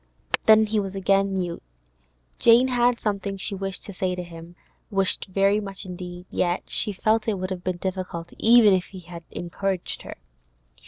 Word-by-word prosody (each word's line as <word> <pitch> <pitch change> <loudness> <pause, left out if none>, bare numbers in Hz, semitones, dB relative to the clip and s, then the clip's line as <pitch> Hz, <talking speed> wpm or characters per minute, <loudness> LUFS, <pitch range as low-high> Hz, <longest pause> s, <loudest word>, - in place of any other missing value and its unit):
Then 220 0 +7
he 215 0 0
was 195 -1 -4
again 195 0 +2
mute. 175 -2 -3 0.8
Jane 235 +3 +6
had 245 -1 +2
something 200 -2 -2
she 195 +2 -3
wished 195 -1 -5
to 200 - -8
say 180 0 -1
to 180 - -5
him—wished 175 +3 -3
very 195 +2 +3
much 195 -1 -7
indeed, 180 -1 -8
yet 175 0 0
she 215 - +2
felt 215 +3 +1
it 215 -3 0
would 185 +1 -4
have 180 -1 -4
been 185 -1 -2
difficult 185 -2 -5
even 225 -3 +6
if 185 -1 +1
he 190 -2 -11
had 170 0 -10
encouraged 185 +1 -3
her. - - -8
195 Hz, 170 wpm, -24 LUFS, 180-210 Hz, 0.8 s, Then